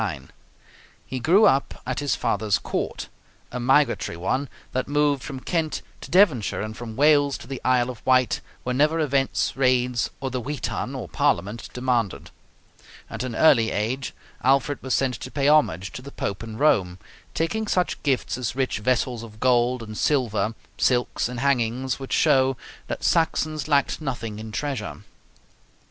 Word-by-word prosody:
He 130 +1 -4
grew 185 - +5
up 135 +1 +2
at 130 0 -2
his 145 -1 0
father's 105 -2 +1
court, - - -3 0.4
a 125 - -4
migratory 135 - +2
one, 130 +10 -1 0.2
that 130 - -2
moved 145 -1 +2
from 130 +4 -6
Kent 160 -1 -1 0.2
to - - -9
Devonshire 165 - +3
and 110 0 -6
from 115 -2 -7
Wales 145 0 +4
to - - -12
the 135 +1 -6
Isle 125 -1 +2
of 120 - -13
Wight 130 -1 +3 0.2
whenever 150 +6 +2
events, 140 -3 +1
raids, 125 -2 +2
or 135 -1 -3
the 125 0 -2
Witan 130 -3 -4
(Parliament) 100 +9 0
demanded. 125 -5 -1 0.8
At - - -5
an 125 -3 -4
early 115 -7 +5
age 125 +6 -2 0.3
Alfred 135 +2 +2
was 130 -1 0
sent 130 -2 +1
to - - -7
pay 140 +1 0
homage 100 - +3
to - - -8
the 140 +2 -10
Pope 100 -6 -4
in 110 -1 -7
Rome, 95 -11 +2 0.4
taking 220 +7 -1
such 180 -3 0
gifts 130 -3 0
as 125 -1 -3
rich 130 -4 -1
vessels 125 +1 0
of 110 -2 -11
gold 125 0 +2
and 110 -1 -8
silver, 115 -6 0 0.2
silks, 120 -1 +1
and 125 -1 -5
hangings, 130 -1 0
which 135 - -8
show 135 -4 +3 0.3
that - - -5
Saxons 155 -2 +1
lacked 145 +1 +1
nothing 115 -7 -4
in 110 0 -7
treasure. 110 -6 -4
130 Hz, 160 wpm, -24 LUFS, 115-140 Hz, 0.8 s, grew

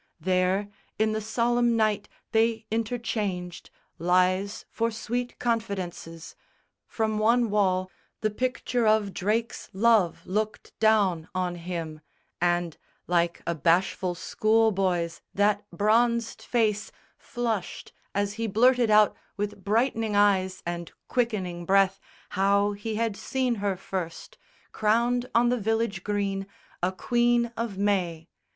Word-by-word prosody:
There 185 +3 +1 0.3
in 220 0 +2
the 215 0 -2
solemn 235 +2 +1
night 215 -2 +1 0.2
they 225 0 +2
interchanged 215 -6 -3 0.3
Lies 185 +4 +1
for 230 0 0
sweet 240 +2 -4
confidences. 190 -8 -3 0.5
From 220 -1 -1
one 230 +1 +3
wall 185 -3 +1 0.3
The 215 - +1
picture 250 0 -1
of 215 -2 +2
Drake's 220 +4 -2
love 205 -4 +3
looked 215 +3 -3
down 200 -7 +3
on 180 -1 0
him; 165 -3 -5 0.4
And, 175 -2 0 0.3
like 170 -1 0
a 170 - 0
bashful 175 +3 +1
schoolboy's, 195 -5 +1
that 205 0 +1
bronzed 230 +5 +1
face 215 -3 0 0.2
Flushed 230 -6 -4 0.2
as 200 0 0
he 225 +1 -3
blurted 245 +3 +4
out 210 -1 +5 0.2
with 205 -1 -4
brightening 225 0 +1
eyes 190 -2 +2
And 170 0 -4 0.2
quickening 195 -8 -1
breath 195 +1 +3 0.3
how 200 +1 +2
he 205 +2 -4
had 225 -1 0
seen 255 +3 -1
her 200 -2 0
first, 185 - -6 0.3
Crowned 240 +3 +1
on 240 +1 +5
the 250 0 +1
village 220 -3 -1
green, 200 -1 -2 0.3
a 180 +1 +1
Queen 240 +3 +1
of 230 -4 -3
May. 180 -5 0
205 Hz, 120 wpm, -27 LUFS, 185-225 Hz, 0.5 s, out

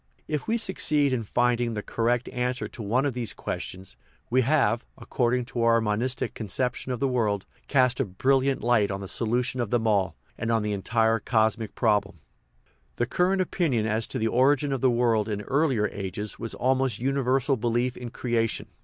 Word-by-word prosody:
If 150 -2 -3
we 225 +1 +2
succeed 150 - +2
in 125 - 0
finding 120 +1 0
the 105 - -4
correct 120 +1 0
answer 125 +1 -2
to 120 - -10
one 120 +6 +1
of 140 - 0
these 120 -3 -3
questions, 95 +1 -6 0.4
we 130 +1 +4
have, 120 -4 +2
according 125 0 0
to 120 - -1
our 115 0 +4
monistic 115 +3 -1
concep 120 +4 -1
tion 130 - -7
of 125 - -2
the 140 - +1
world, 110 -6 0 0.2
cast 130 -2 +2
a 135 - +2
brilliant 135 +7 +1
light 115 -4 +3
on 95 0 -4
the 95 - -6
solution 120 +5 -1
of 115 - -2
them 120 -1 0
all, 100 -4 +1 0.2
and 115 0 -1
on 115 -2 +2
the 105 0 -1
entire 115 +3 +1
cosmic 110 -1 0
problem. 105 -5 +1 0.8
The 120 - 0
current 185 +7 +1
opinion 145 - 0
as 110 0 0
to - - -4
the 110 - 0
origin 135 +4 +3
of 130 - -2
the 130 - +4
world 115 -3 +2
in 105 -1 -2
earlier 135 -4 +1
ages 100 +2 -5
was 115 0 -3
almost 130 -3 +1
a 120 - -9
universal 135 0 +1
belief 120 +1 0
in 125 -1 -7
creation. 115 -2 -2
120 Hz, 190 wpm, -26 LUFS, 110-130 Hz, 0.8 s, we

